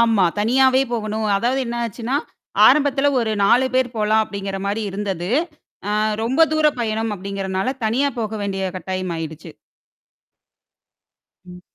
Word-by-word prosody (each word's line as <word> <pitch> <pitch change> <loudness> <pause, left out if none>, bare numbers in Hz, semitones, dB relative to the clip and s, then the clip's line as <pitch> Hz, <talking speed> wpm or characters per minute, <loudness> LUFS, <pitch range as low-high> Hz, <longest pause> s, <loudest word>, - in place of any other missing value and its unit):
ஆமா. 225 -5 +4
தனியாவே 260 +4 +4
போகணும். 215 -1 -2
அதாவது 245 +6 0
என்ன 235 0 -4
ஆச்சுன்னா, 235 +4 -3 0.5
ஆரம்பத்துல 285 -1 +4
ஒரு 220 -2 -1
நாலு 245 +6 +4
பேர் 255 -1 +1
போலாம் 215 0 +2
அப்படின்ற 195 -2 -5
மாதிரி 205 +3 -1
இருந்தது. 195 -2 -3 0.6
அ - - 0 0.3
ரொம்ப 260 +8 +2
தூரம் 305 -3 +2
பயணம் 220 -1 -1
அப்படிங்கறனால 195 +4 -3
தனியா 255 +6 +1
போக 220 -1 -3
வேண்டிய 195 -1 -3
கட்டாயம் 185 0 -4
ஆயிடுச்சு. 160 -1 -7 2.0
ம். 180 0 -12
220 Hz, 130 wpm, -21 LUFS, 195-250 Hz, 2.0 s, ஆமா